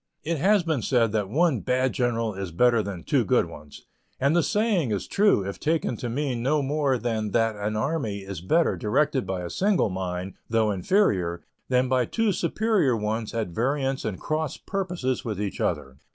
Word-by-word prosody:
It 160 0 -1
has 200 +3 +4
been 160 -6 0
said 115 -1 +2
that 105 -3 -1
one 155 0 +2
bad 130 +3 0
general 115 -3 0
is 95 -1 -5
better 115 +7 +3
than 100 -5 -6
two - - +2
good - - +2
ones, 75 -1 -12 0.3
and 140 +4 +2
the 175 - +5
saying 200 - +1
is 100 -3 -2
true 200 - +3
if 100 - -6
taken 155 -5 0
to 120 - -4
mean 130 -1 -2
no 145 +4 +1
more 140 -1 +1
than 110 -3 -2
that 115 -1 +2
an 105 +1 -3
army 110 -5 -1
is 95 -3 -6
better 160 - +2
directed 135 +5 0
by 95 -2 -3
a 85 - -5
single 195 - +1
mind, 90 0 -4 0.2
though 110 -2 +2
inferior, 95 - +1 0.3
than 125 0 +3
by 130 -1 +2
two 225 - 0
superior 185 - +1
ones 110 +1 -2
at 110 -5 -1
variance 135 - -1
and 100 -4 -3
cross 155 -2 -2
purposes 180 -10 -2
with 105 -4 -4
each 105 -2 -3
other. 65 0 -2
120 Hz, 190 wpm, -25 LUFS, 105-155 Hz, 0.3 s, the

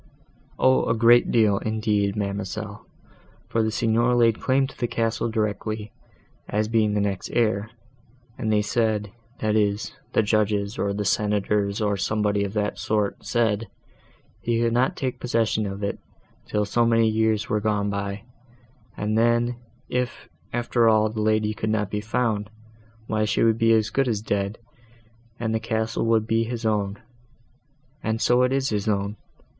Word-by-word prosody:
"O! 130 0 +3
a 115 - +2
great 120 +2 +5
deal, 105 -4 +3
indeed, 105 -2 0
ma'amselle, 100 0 -4 0.6
for 115 - +1
the 110 - +1
Signor 115 +2 +2
laid 115 -2 +3
claim 135 +1 +2
to - - -9
the 120 - -1
castle 115 0 -1
directly, 110 -1 -2 0.6
as 105 +1 0
being 110 -2 +2
the - - +2
next 100 -2 -2
heir, 110 -2 +1 0.7
and 110 -4 -2
they 105 -1 +3
said, 105 -2 0 0.3
that 110 0 +1
is, 105 -1 0 0.2
the - - +3
judges, 105 0 0
or 100 - 0
the 105 +1 -2
senators, 105 0 +1
or 105 -1 +1
somebody 105 0 0
of 100 0 -4
that 105 -3 -1
sort, 105 0 -1
said, 115 -2 0 0.7
he 115 -1 0
could 115 0 +1
not 125 +2 +2
take 130 -2 -3
possession 115 -3 0
of 100 +1 -6
it 100 - -2 0.5
till 105 0 0
so 120 +4 +1
many 115 -1 +3
years 110 0 +1
were 105 0 0
gone 105 -1 0
by, 100 +1 -4 0.7
and 105 +1 -1
then, 120 +1 +2 0.3
if, 125 -1 -3 0.2
after 120 -1 +2
all, 110 0 +3
the 110 0 -4
lady 110 0 +1
could 110 +1 -3
not 105 -2 0
be 105 - -2
found, 110 -2 -1 0.6
why 110 -1 0
she 105 +1 +1
would 115 -1 +3
be 115 0 +4
as 110 -1 +3
good 135 +2 +1
as 110 -3 -1
dead, 100 0 -1 0.8
and 110 -1 -1
the 110 - +1
castle 110 0 -1
would 110 -1 +3
be 115 0 +1
his 115 0 -5
own; 105 -2 0 1.0
and 110 0 -1
so 120 +2 +3
it 125 0 +2
is 135 0 +1
his 105 -1 -2
own. 100 0 0
110 Hz, 165 wpm, -24 LUFS, 105-115 Hz, 1.0 s, great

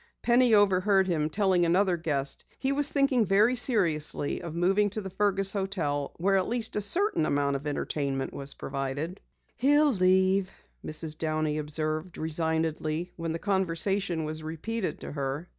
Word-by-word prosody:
Penny 240 -1 +4
overheard 195 -1 +3
him 155 -4 -1
telling 190 0 +1
another 180 +2 +2
guest 145 -5 -3
he 270 - -1
was 290 +1 +3
thinking 275 -4 +2
very 210 +5 +3
seriously 170 - +2
of 170 -2 -7
moving 195 +4 +2
to 205 - -5
the 190 -2 -7
Fergus 195 -1 +2
hotel 175 -8 -2
where 195 +3 +2
at 185 - 0
least 235 -1 -2
a 210 - 0
certain 350 - +2
amount 140 -1 0
of 140 +2 -5
entertainment 140 -2 -3
was 140 0 -2
provided. 140 +7 -5 0.4
"He'll 290 +2 +3
leave," 190 0 +2 0.3
Mrs. 155 0 -5
Downey 155 -1 -1
observed 155 +3 -3
resignedly 160 +1 -2
when 165 -1 -4
the 165 - -2
conversation 190 -1 0
was 155 +1 -1
repeated 180 +7 -4
to - - -7
her. 140 +3 -4
175 Hz, 155 wpm, -27 LUFS, 155-200 Hz, 0.4 s, Penny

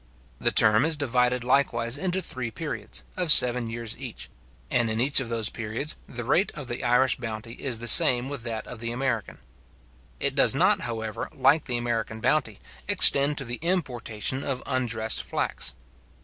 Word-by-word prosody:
The - - +1
term 110 +2 +5
is 160 0 +2
divided 125 -3 0
likewise 120 -2 0
into 185 +4 -2
three 130 -6 -4
periods, 160 +6 -7
of 180 -4 +3
seven 125 -4 +8
years 115 -1 -5
each; - - -9 0.4
and 120 -2 +1
in 110 +1 -3
each 140 +4 +4
of 130 -4 -5
those 115 -2 -1
periods, 115 +7 -4
the 120 0 -7
rate 170 - 0
of 150 - -8
the 120 0 -5
Irish 125 +2 +2
bounty 115 -2 -7
is 125 -3 -4
the 120 +1 -7
same 120 +2 +6
with 140 -2 -7
that 115 -2 -6
of 125 - -10
the 115 0 -4
American. 120 -3 -4 0.8
It - - +1
does - - +3
not, - - +2
however, 110 -2 -6
like 150 +1 +2
the 125 -2 -1
American 115 -2 -4
bounty, 115 -4 -1 0.3
extend 140 +1 +4
to 135 - -4
the 120 0 -3
importation 130 - -2
of 130 -1 -4
undressed 115 -4 -1
flax. - - -4
120 Hz, 175 wpm, -24 LUFS, 115-135 Hz, 0.8 s, seven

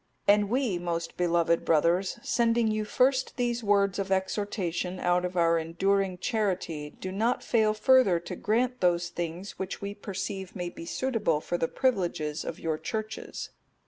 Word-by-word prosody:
'(260) 205 - +7
And 205 - -2
we, 245 -8 +1
most 170 -1 -3
beloved 170 -1 +2
brothers, 170 +6 +2
sending 230 -1 +2
you 215 0 -1
first 260 +3 +1
these 240 -1 0
words 200 -2 +2
of 195 -1 -2
exhortation 190 -2 -1
out 180 0 +2
of 180 0 -3
our 165 -1 +4
enduring 185 +3 0
charity, 180 - -1
do 185 +4 -7
not 225 +6 0
fail 215 -2 +2
further 245 -6 +5
to 180 - -6
grant 245 +6 0
those 175 -1 +2
things 175 +3 -5
which 190 0 -4
we 200 0 -4
perceive 195 -1 -5
may 180 -1 -3
be 170 - -10
suitable 225 - 0
for 175 +2 -3
the 165 - +1
privileges 175 - -1
of 165 - -6
your 160 -2 -2
Churches. 215 0 -5
190 Hz, 165 wpm, -28 LUFS, 175-215 Hz, -, 260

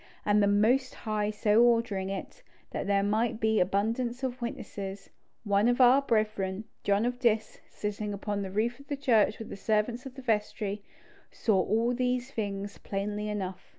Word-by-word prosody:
And 210 0 +4
the 200 - +4
Most 230 +6 +2
High 215 -2 -1
so 210 +1 +3
ordering 230 -5 +2
it, 195 - -6 0.3
that - - -3
there 200 0 +2
might 220 +3 0
be 220 -1 +2
abundance 230 +7 0
of 255 -1 -3
witnesses, 200 -4 -6 0.3
one 205 0 +3
of 245 +1 +2
our 255 +2 +7
brethren, 215 -5 0 0.2
John 200 +2 +2
of 245 0 -2
Diss, 220 -3 +1
sitting 210 0 -4
upon 205 0 -3
the 195 - -4
roof 225 +6 -1
of 280 - -15
the 285 - -3
church 225 -6 +3
with 225 - -8
the - - -6
servants 220 +5 0
of 260 - -11
the 265 - -9
vestry, 210 -3 -1 0.5
saw 200 -5 +2
all 230 +4 +1
these 250 +1 -1
things 200 -3 -4
plainly 210 +1 -3
enough. 190 -3 -5
215 Hz, 175 wpm, -29 LUFS, 200-240 Hz, 0.5 s, our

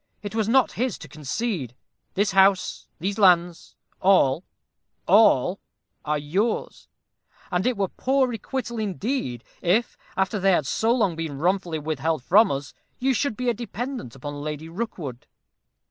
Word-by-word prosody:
It 205 - -5
was 220 -1 0
not 260 +1 +4
his 245 -2 -2
to 155 - -11
concede. 150 - -3 0.4
This 205 +1 +2
house 195 0 +3
these 195 +5 -2
lands 175 -3 +3 0.2
all 180 -5 +4 0.6
all 200 - +5 0.4
are 150 0 0
yours; 190 +10 -2 0.6
and 180 +4 +1
it 250 -3 0
were 195 -1 +1
poor 265 +6 +1
requital, 235 0 -4
indeed, 205 - -2 0.2
if, 200 +7 +1 0.2
after 195 +2 +1
they 195 0 +4
have 155 - +2
so 220 - +1
long 210 -8 +2
been 160 -4 -4
wrongfully 175 +1 0
withheld 155 -1 -2
from 210 - +5
us, 140 0 -4 0.2
you 265 +1 +1
should 255 -2 -1
be 250 0 -2
a 240 - +3
dependant 240 - -5
on 145 0 -5
Lady 155 +1 -5
Rookwood." 165 - -5
190 Hz, 145 wpm, -24 LUFS, 155-225 Hz, 0.6 s, all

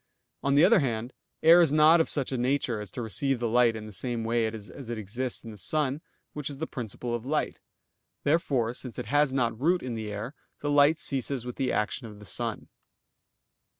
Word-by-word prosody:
On 140 0 +1
the 150 +4 +7
other 215 +1 +6
hand, 120 -3 -2 0.3
air 165 +2 +8
is 165 -4 +4
not 155 +2 +6
of - - -1
such 140 -3 0
a 130 - -1
nature 125 -3 0
as 105 - -8
to 120 +6 -5
receive 135 +4 0
light 120 0 +3
in 110 -1 -6
the 110 - -9
same 115 +4 -3
way 115 0 +1
as 110 +3 -8
it 120 - -3
exists 120 +5 -4
in 115 - -8
the 105 - -11
sun, 145 - -1 0.3
which 150 -1 -4
is 140 - -7
the 160 - -3
principle 120 -2 -5
of 120 -1 -2
light. 150 +4 -1 0.6
Therefore, 140 -7 +1
since 125 -2 -5
it - - -4
has 145 +4 +2
not 120 -3 -1
root 175 +4 +2
in 125 -2 -4
the 110 -2 -4
air, 105 +7 -5 0.3
the 145 - -1
light 145 +2 +5
ceases 135 -5 -2
with 125 - -6
the 130 -2 0
action 110 +3 -1
of 105 -2 -11
the 105 - -13
sun. 115 +2 -4
125 Hz, 215 wpm, -28 LUFS, 115-145 Hz, 0.6 s, air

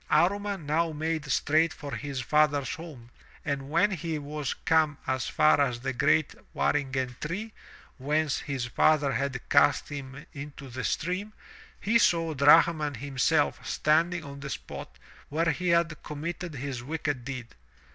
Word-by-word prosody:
Amman 195 +2 +1
now 160 +3 +1
made 160 0 -2
straight 160 +2 +3
for 145 -2 -8
his 140 -3 -4
father's 150 +1 +2
home, 145 -8 -10 0.3
and 140 -1 -2
when 170 +7 +3
he 165 -3 -3
was 150 -1 -4
come 155 -3 +3
as 130 0 -1
far 155 -1 +4
as 120 -4 0
the 130 - -2
great 155 +4 +2 0.2
waringen 130 -3 0
tree, 210 +8 -4 0.5
whence 150 +2 0
his 135 -4 -3
father 145 +3 +3
had 135 -1 -1
cast - - +4
him 140 0 -7
into 140 -1 -8
the 130 +1 -5
stream, 185 +6 -2 0.5
he 230 +3 +3
saw 165 -6 +2
Drahman 150 +1 +5
himself 140 +4 +1
standing 165 +3 +1
on 140 -2 -9
the 140 0 -6
spot 60 - -7 0.3
where 165 +3 +1
he 180 +5 -3
had 170 -2 +2
committed 170 +2 -5
his 135 -2 -4
wicked 145 -1 -3
deed. 130 -2 -6
150 Hz, 145 wpm, -28 LUFS, 140-165 Hz, 0.5 s, Drahman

